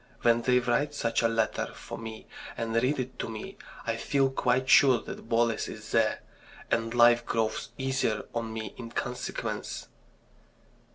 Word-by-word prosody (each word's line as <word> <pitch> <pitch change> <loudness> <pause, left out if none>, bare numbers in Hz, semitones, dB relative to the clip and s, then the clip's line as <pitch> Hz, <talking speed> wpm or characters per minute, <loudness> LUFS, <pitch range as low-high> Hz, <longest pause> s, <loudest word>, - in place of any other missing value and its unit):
When 120 0 +4
they 125 +1 +3
write 145 +4 +1
such 115 -5 0
a 115 - +4
letter 115 -1 0
for - - -8
me, 110 -1 -8 0.3
and 115 0 -2
read 125 +6 +2
it 130 0 -5
to - - -3
me, 110 -1 -7 0.3
I - - -1
feel 135 -1 +1
quite 130 0 +1
sure 130 -3 +7
that 115 - -9
Boles 115 -1 +2
is 110 0 -9
there. 115 -2 +2 0.5
And 115 0 +1
life 120 0 +6
grows 110 -1 -1
easier 130 -5 0
for 115 - 0
me 110 -1 -5
in 115 -2 -7
consequence." 125 +1 -4
115 Hz, 160 wpm, -29 LUFS, 115-125 Hz, 0.5 s, sure